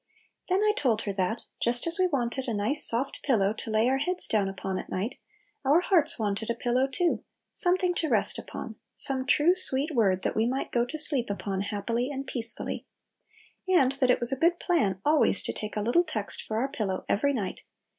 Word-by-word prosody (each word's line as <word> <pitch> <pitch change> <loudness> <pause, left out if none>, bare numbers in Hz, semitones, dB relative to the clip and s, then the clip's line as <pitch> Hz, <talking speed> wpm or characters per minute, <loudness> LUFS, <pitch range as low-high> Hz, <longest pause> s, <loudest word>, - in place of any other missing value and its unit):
Then 380 +3 +1
I 425 0 +3
told 230 - 0
her 200 - -4
that, 195 +4 -2 0.2
just 240 +1 +4
as 335 +2 0
we 370 - +3
wanted 265 -4 -3
a 230 - -2
nice 265 +9 +2
soft 250 +4 +1
pillow 210 -7 +1
to 225 - -7
lay 220 +2 +1
our 265 +1 +1
heads 360 +6 -2
down 205 -3 0
upon 190 0 -5
at - - -9
night, 210 +8 -4 0.4
our 290 +6 +3
hearts 360 -5 +3
wanted 215 0 -3
a 235 - -1
pillow 245 +3 0
too, 335 +6 -1 0.3
something 365 -1 +4
to 320 -3 -2
rest - - +3
upon, 220 -4 -8 0.2
some 265 -1 -2
true, 305 +5 +4
sweet 310 -4 +3
word 195 -7 +1
that - - -2
we 220 +1 +1
might 260 +2 -3
go 240 0 0
to 310 - -6
sleep 280 -6 +1
upon 200 -1 -4
happily 230 +5 -3
and 275 -1 -5
peacefully. 235 -3 0 0.8
And 300 -9 +3
that 270 -2 0
it 250 - +3
was 240 +1 +5
a 270 - -2
good 345 +1 +2
plan 210 - 0
always 300 +1 +3
to - - -3
take 215 0 -7
a 210 - -2
little 240 +12 +2
text 220 - -3
for 215 - -3
our 255 +4 0
pillow 195 -4 -4
every 280 +8 +1
night. 205 -9 -4
250 Hz, 210 wpm, -27 LUFS, 215-295 Hz, 0.8 s, was